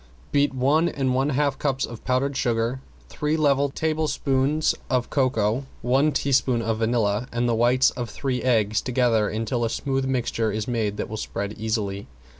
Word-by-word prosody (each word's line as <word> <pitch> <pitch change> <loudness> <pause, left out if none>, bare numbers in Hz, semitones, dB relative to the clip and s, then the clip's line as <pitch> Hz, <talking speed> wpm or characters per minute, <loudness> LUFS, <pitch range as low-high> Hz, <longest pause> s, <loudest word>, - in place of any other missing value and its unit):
Beat 145 0 +3
one 140 +6 +2
and 130 -2 -1
one 135 +3 +1
half 140 -1 0
cups 135 -2 0
of 115 -2 -10
powdered 135 +2 0
sugar, 120 0 0 0.3
three 150 - -1
level 140 -2 +2
tablespoons 150 -1 0 0.2
of 125 -2 0
cocoa, 130 -2 +1 0.2
one 135 +5 +3
teaspoon 130 -4 +1
of 110 -1 -1
vanilla, 110 -1 +1
and 120 +1 0
the 120 - +2
whites 120 +3 +3
of 120 -3 -5
three 130 +2 -2
eggs 110 -4 +2
together 120 -4 +1
until 115 +2 -2
a 115 - +1
smooth 135 +2 -1
mixture 120 -4 -1
is 105 +1 -3
made 110 -4 -1
that - - -3
will 110 - -6
spread 100 -1 -4
easily. 105 -3 -3
125 Hz, 170 wpm, -24 LUFS, 115-135 Hz, 0.3 s, Beat